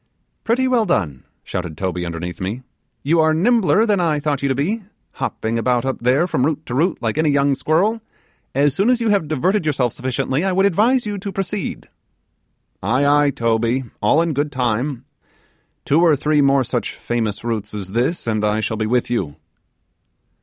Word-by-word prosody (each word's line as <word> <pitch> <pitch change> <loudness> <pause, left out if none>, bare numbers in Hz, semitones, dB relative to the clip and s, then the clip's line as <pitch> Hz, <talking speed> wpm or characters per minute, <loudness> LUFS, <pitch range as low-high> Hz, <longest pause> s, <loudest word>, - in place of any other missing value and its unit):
'Pretty 255 +3 +1
well 250 -3 +3
done,' 85 - -1 0.2
shouted 85 -4 -5
Toby 90 -2 -2
underneath 85 +2 -6
me; 105 +8 -4 0.4
'you 160 +4 +2
are 160 0 +3
nimbler 220 +3 +3
than 205 -3 +2
I 160 -4 +1
thought 145 -2 -1
you 140 - 0
to 135 - +1
be 190 - -1 0.4
hopping 115 +1 -2
about 125 +1 +1
up 135 - -2
there 130 +7 +2
from 145 -7 0
root 155 +2 -1
to 120 - -6
root 165 +7 +1
like 115 +4 -1
any 155 -1 +3
young 140 0 +3
squirrel. 185 +11 +1 0.5
As 140 0 +3
soon 195 - +1
as 250 -1 +3
you 230 -2 0
have 200 -7 +2
diverted 175 +7 +1
yourself 135 -6 0
sufficiently, 130 +3 -2
I 190 -1 0
would 195 +2 +3
advise 225 +7 +2
you 205 -1 -3
to 200 +1 -5
proceed.' 195 +1 -4 0.9
'Aye, 125 +9 +1
aye, 145 0 +4
Toby, 115 0 0 0.2
all 145 +10 +3
in 165 -2 -1
good 145 +1 -1
time: 125 0 -1 0.8
two 150 +4 +3
or 165 -3 +5
three 150 +1 +2
more 140 -1 +4
such 120 0 -3
famous 110 -4 -3
roots 110 -3 -3
as 95 -3 -6
this, 125 - -1
and 110 -2 -1
I 105 +1 +1
shall 110 0 -2
be 110 0 -1
with 120 +1 0
you. 90 -12 -2
140 Hz, 190 wpm, -20 LUFS, 115-175 Hz, 0.9 s, or